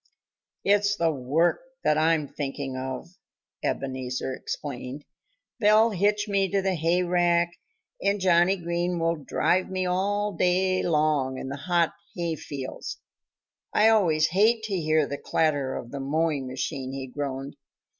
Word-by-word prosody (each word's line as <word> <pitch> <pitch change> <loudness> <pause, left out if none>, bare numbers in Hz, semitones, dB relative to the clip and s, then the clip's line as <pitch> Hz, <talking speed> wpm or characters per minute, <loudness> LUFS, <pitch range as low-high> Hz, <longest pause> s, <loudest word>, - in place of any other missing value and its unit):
"It's 205 0 +3
the 165 -4 +2
work 145 +5 +1 0.2
that - - +3
I'm 155 -1 +2
thinking 135 -1 -4
of," 130 +6 -5 0.5
Ebenezer 130 -1 -2
explained. 135 +1 -6 0.5
"They'll 215 +2 +5
hitch 210 +2 +1
me 195 -2 +1
to 200 - +1
the 190 0 0
hayrake 175 +1 +2 0.5
and 200 +1 +1
Johnnie 180 0 +4
Green 175 0 -1
will 165 0 +1
drive 175 +5 0
me 185 -1 -1
all 205 +3 0
day 185 +2 +2
long 150 -5 +1
in 130 - -5
the 140 - -4
hot 170 +3 +1 0.2
hayfields. 155 -6 -4 0.8
I 215 +1 +6
always 170 -8 +4
hate 220 +6 +3
to 215 -3 -2
hear 155 -3 +2
the 140 0 -5
clatter 145 -4 0
of 120 - -7
the 140 - -5
mowing 145 0 0
machine," 130 +1 -4
he 135 -1 -4
groaned. 135 +1 -5
165 Hz, 135 wpm, -26 LUFS, 140-185 Hz, 0.8 s, I